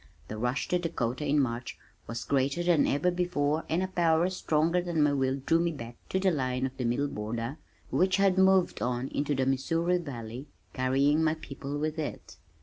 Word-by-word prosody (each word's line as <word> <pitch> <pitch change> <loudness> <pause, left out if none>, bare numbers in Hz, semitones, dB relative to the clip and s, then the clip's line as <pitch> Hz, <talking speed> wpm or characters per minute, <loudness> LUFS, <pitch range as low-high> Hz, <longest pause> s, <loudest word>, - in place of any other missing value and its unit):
The 110 - -5
rush 125 +4 -1
to 180 - +2
Dakota 150 -5 -2
in 145 +1 +3
March 120 -2 -2 0.3
was 115 +1 -4
greater 140 +4 +1
than 170 -4 +3
ever 145 +6 +2
before 165 -4 0
and 170 +3 +1
a - - -1
power 170 -1 +2
stronger 165 -1 +1
than 170 -3 0
my 145 -1 +3
will 135 -1 +1
drew 165 - +3
me 170 0 +1
back 120 -6 -8
to 190 - 0
the 190 -1 +3
line 130 -4 -1
of 130 0 -5
the 125 - -2
middle 125 +5 +1
border 115 +4 -4 0.3
which 190 +2 +3
had 195 -2 +3
moved 190 -1 +3
on 125 +1 -1
into 145 0 -1
the 130 0 +1
Missouri 165 +7 +1
Valley, 125 -3 -7 0.3
carrying 140 +4 +2
my 155 0 +2
people 145 -2 -6
with 155 +2 -2
it. 150 - -6
145 Hz, 195 wpm, -29 LUFS, 130-170 Hz, 0.3 s, in